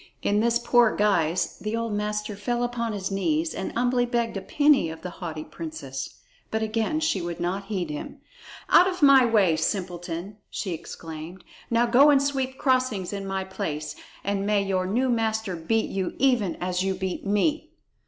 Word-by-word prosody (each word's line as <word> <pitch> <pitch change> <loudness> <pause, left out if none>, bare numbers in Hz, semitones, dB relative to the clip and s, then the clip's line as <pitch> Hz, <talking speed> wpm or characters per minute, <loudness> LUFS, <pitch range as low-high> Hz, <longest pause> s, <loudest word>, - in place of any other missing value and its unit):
In 205 +1 +2
this 235 +1 +3
poor 240 -1 +3
guise 175 -5 +1
the 215 +1 -3
old 230 -2 -2
master 210 0 -2
fell 240 +4 -1
upon 240 -1 -2
his 200 -2 -3
knees 165 -4 0
and - - -4
humbly 245 0 +1
begged 235 -2 -1
a 195 - -3
penny 285 - +3
of 160 0 -9
the 180 - -5
haughty 160 -3 -4
princess. 140 -6 -7 0.3
But 220 0 -1
again 225 +7 0
she 260 - +1
would 170 0 -5
not 185 +3 -2
heed 185 -6 -3
him. 150 - -6 0.5
"Out 360 - +7
of 365 -4 -2
my 270 -3 +7
way, 200 -8 +4
simpleton!" 175 +2 -3
she 190 - -4
exclaimed. 165 +2 -8 0.3
"Now 235 +1 +3
go 255 +5 +6
and 285 -2 +6
sweep 270 -2 -1
crossings 255 -9 +1
in 200 -1 -4
my 190 0 -2
place, 150 -5 -4 0.3
and 200 0 -1
may 205 0 +2
your 185 -2 0
new 245 +7 +1
master 220 -4 0
beat 195 +7 0
you 190 -2 -2
even 245 -9 +2
as 180 0 -2
you 190 0 0
beat 190 -1 -4
me!" 295 +11 0
205 Hz, 180 wpm, -25 LUFS, 180-235 Hz, 0.5 s, Out